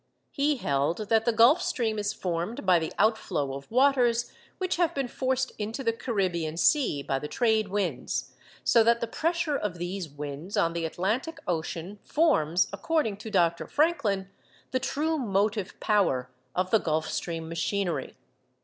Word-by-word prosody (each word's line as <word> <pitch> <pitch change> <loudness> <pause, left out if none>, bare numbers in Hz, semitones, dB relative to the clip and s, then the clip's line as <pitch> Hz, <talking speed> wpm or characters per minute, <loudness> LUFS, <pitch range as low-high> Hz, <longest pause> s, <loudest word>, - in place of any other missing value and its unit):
He 290 0 +1
held 160 - -1
that 225 -1 +3
the 235 - +4
Gulf 235 +10 +6
Stream 225 -10 -1
is 205 0 0
formed 180 +4 -3
by 180 -2 +5
the 160 - -3
outflow 200 -10 +1
of 140 0 -8
waters 245 -2 +3 0.3
which 370 -2 -1
have 345 -2 +1
been 275 -2 -1
forced 260 +1 -1
into 220 +6 -3
the 230 -2 +1
Caribbean 180 -9 -1
Sea 205 - +3
by 135 -1 -1
the 150 - -5
trade 220 - +1
winds; 185 -10 -2 0.3
so 230 - +5
that 235 +1 +4
the - - -1
pressure 330 +4 -1
of 210 -9 -2
these 175 0 -4
winds 145 +5 -6
on 165 0 +2
the 170 -1 -2
Atlantic 215 - -2
Ocean 175 +3 -3
forms, 180 - +2
according 220 0 0
to 220 +2 -8
Dr. 170 -4 +1
Franklin, 270 - +1 0.4
the 255 - +1
true 305 +5 -1
motive 205 -3 0
power 130 -12 +1 0.2
of 185 +1 0
the 220 - +5
Gulf 155 -2 -1
Stream 165 -2 -3
machinery. 165 -2 -2
205 Hz, 160 wpm, -27 LUFS, 170-245 Hz, 0.4 s, Gulf